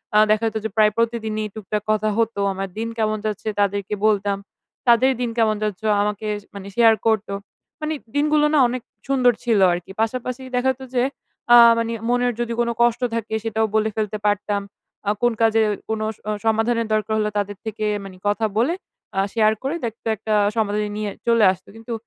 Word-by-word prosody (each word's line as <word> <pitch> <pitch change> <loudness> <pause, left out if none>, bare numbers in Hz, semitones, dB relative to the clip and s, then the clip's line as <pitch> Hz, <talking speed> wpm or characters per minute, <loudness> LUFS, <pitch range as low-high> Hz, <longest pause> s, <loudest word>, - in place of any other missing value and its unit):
আ - - +7
দেখা 215 +1 +2
যেত 220 0 -2
যে - - 0
প্রায় 215 -1 +5
প্রতিদিনই 220 -2 -1
টুকটাক 210 0 -3
কথা 215 0 +1
হতো। 230 -2 0
আমার 195 +1 -4
দিন 225 +1 -2
কেমন 215 -1 +1
যাচ্ছে, 215 0 -3
তাদেরকে 200 0 0
বলতাম। 200 -1 +1 0.5
তাদের 240 +3 +5
দিন 240 - 0
কেমন 220 -2 +3
যাচ্ছে, 210 0 -3
ও - - +4
আমাকে 210 +1 -2 0.2
শ - - -23
মানে 200 0 -8
শেয়ার 230 -2 +6
করত। 220 -1 +2 0.5
মানে 310 +1 -1 0.2
দিনগুলো 300 +1 +3
না 295 - +5
অনেক 250 0 -3 0.3
সুন্দর 255 -3 +4
ছিল 230 -4 +2
আরকি। 175 +2 -5
পাশাপাশি 250 +3 -2
দেখা 260 +1 +2
যেত - - -17
যে, 245 - +3 0.5
আ - - +10 0.2
মানি 230 0 -1 0.2
মনের 245 0 +2
যদি 235 -1 -1
কোন 235 0 +2
কষ্ট 240 +1 +3
থাকে, 220 -1 -4
সেটাও 220 0 0
বলে 220 0 +2
ফেলতে 215 -1 -2
পারতাম। 205 0 +1 0.5
আ - - +3
কোন 240 0 +3
কাজে 225 0 +4 0.3
কোন 220 -1 -1 0.2
স - - -27
অ - - +1
সমাধানের 225 +1 +1
দরকার 215 0 0
হলো, 210 - +1
তাদের 205 -1 -2
থেকে 215 0 -3 0.2
মানি 190 -2 -10
কথা 215 +2 +1
বলে, 255 +9 +2 0.4
আ - - +3
শেয়ার 220 -1 +4
করে 280 +5 -1
দেখতো 225 0 -7
একটা 215 +1 -3 0.2
সমাধান 210 -1 0
নিয়ে 210 -1 -2 0.2
চলে 230 -2 +4
আসত। 185 0 -9
কিন্তু 225 +1 -7
220 Hz, 195 wpm, -22 LUFS, 210-235 Hz, 0.5 s, আ